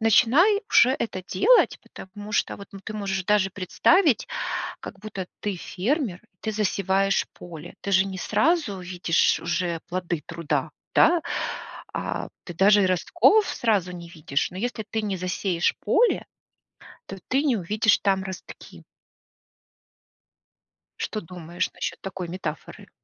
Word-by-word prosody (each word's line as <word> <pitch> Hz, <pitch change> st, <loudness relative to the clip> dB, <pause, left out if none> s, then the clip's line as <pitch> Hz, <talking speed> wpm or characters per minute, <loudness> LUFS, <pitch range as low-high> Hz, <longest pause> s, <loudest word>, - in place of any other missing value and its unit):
начинай 280 Hz, -, +5 dB
уже 250 Hz, -, +6 dB
это 185 Hz, -4 st, -3 dB
делать, 470 Hz, -, +4 dB
потому 205 Hz, +2 st, -10 dB
что -, -, 0 dB
вот 200 Hz, -, -11 dB
ну 195 Hz, -, -9 dB
ты 215 Hz, -, -7 dB
можешь 195 Hz, -3 st, -2 dB
даже 205 Hz, -1 st, +3 dB
представить, 240 Hz, -, +3 dB, 0.5 s
как -, -, -9 dB
будто 195 Hz, -3 st, -6 dB
ты 205 Hz, -2 st, -2 dB
фермер, 210 Hz, -, -2 dB, 0.2 s
ты 220 Hz, -, -2 dB
засеваешь 195 Hz, -1 st, +1 dB
поле. 170 Hz, -1 st, -10 dB
Ты 200 Hz, -, -3 dB
же 190 Hz, 0 st, +5 dB
не 190 Hz, -1 st, -5 dB
сразу 215 Hz, -, +1 dB
видишь 180 Hz, -2 st, +1 dB
уже 170 Hz, 0 st, -1 dB
плоды 175 Hz, -3 st, -2 dB
труда, 165 Hz, -2 st, -2 dB, 0.2 s
да? 345 Hz, -1 st, +5 dB, 0.7 s
А -, -, -3 dB, 0.2 s
ты 175 Hz, -, -7 dB
даже 200 Hz, +2 st, +5 dB
и 185 Hz, -, +3 dB
ростков 345 Hz, -, +4 dB
сразу 205 Hz, -6 st, +1 dB
не 175 Hz, -1 st, -8 dB
видишь. 155 Hz, -4 st, -2 dB
Но 180 Hz, -, -9 dB
если 230 Hz, +1 st, -3 dB
ты 220 Hz, -, -1 dB
не 200 Hz, -2 st, -1 dB
засеешь 180 Hz, -1 st, 0 dB
поле, 485 Hz, -, +2 dB, 0.8 s
то 195 Hz, -, -8 dB
ты 270 Hz, +3 st, +2 dB
не 265 Hz, -6 st, +2 dB
увидишь 210 Hz, +3 st, +2 dB
там 195 Hz, -1 st, +1 dB
ростки. 190 Hz, -1 st, -9 dB, 2.2 s
Что 215 Hz, -, -3 dB
думаешь 175 Hz, 0 st, -4 dB
насчет -, -, -4 dB
такой 190 Hz, -2 st, -5 dB
метафоры? 165 Hz, -3 st, -6 dB
195 Hz, 140 wpm, -25 LUFS, 180-220 Hz, 2.2 s, уже